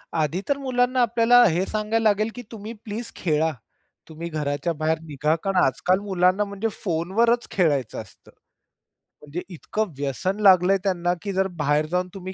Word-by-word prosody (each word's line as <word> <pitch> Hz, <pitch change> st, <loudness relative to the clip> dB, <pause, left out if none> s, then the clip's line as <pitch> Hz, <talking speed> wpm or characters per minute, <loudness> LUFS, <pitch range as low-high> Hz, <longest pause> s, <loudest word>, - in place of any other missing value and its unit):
आधी 160 Hz, +3 st, 0 dB
तर 285 Hz, -, +2 dB
मुलांना 255 Hz, -2 st, +1 dB
आपल्याला 240 Hz, +1 st, +5 dB
हे 180 Hz, +3 st, 0 dB
सांगायला 215 Hz, +1 st, -1 dB
लागेल 215 Hz, +2 st, +1 dB
की 245 Hz, -, -6 dB
तुम्ही 220 Hz, +1 st, -7 dB
प्लीज 225 Hz, +2 st, -6 dB
खेळा. 160 Hz, -2 st, +1 dB, 0.6 s
तुम्ही 165 Hz, +2 st, -6 dB
घराच्या 150 Hz, +2 st, -2 dB
बाहेर 155 Hz, +1 st, -1 dB
निघा. 150 Hz, +1 st, 0 dB
कारण 195 Hz, -1 st, -1 dB
आजकाल 180 Hz, +8 st, +1 dB
मुलांना 190 Hz, 0 st, +2 dB
म्हणजे 200 Hz, +2 st, -3 dB, 0.2 s
फोनवरच 205 Hz, +8 st, +1 dB
खेळायचं 145 Hz, -, 0 dB
असतं. 95 Hz, -, -17 dB, 0.9 s
म्हणजे 150 Hz, +4 st, -6 dB
इतकं 200 Hz, +3 st, -3 dB
व्यसन 150 Hz, +9 st, -2 dB
लागलंय 190 Hz, -1 st, +6 dB
त्यांना, 175 Hz, -3 st, 0 dB
की 200 Hz, -1 st, -4 dB
जर 190 Hz, 0 st, +1 dB
बाहेर 150 Hz, +1 st, +2 dB
जाऊन 180 Hz, 0 st, 0 dB
तुम्ही 190 Hz, -1 st, -7 dB
185 Hz, 155 wpm, -24 LUFS, 160-215 Hz, 0.9 s, लागलंय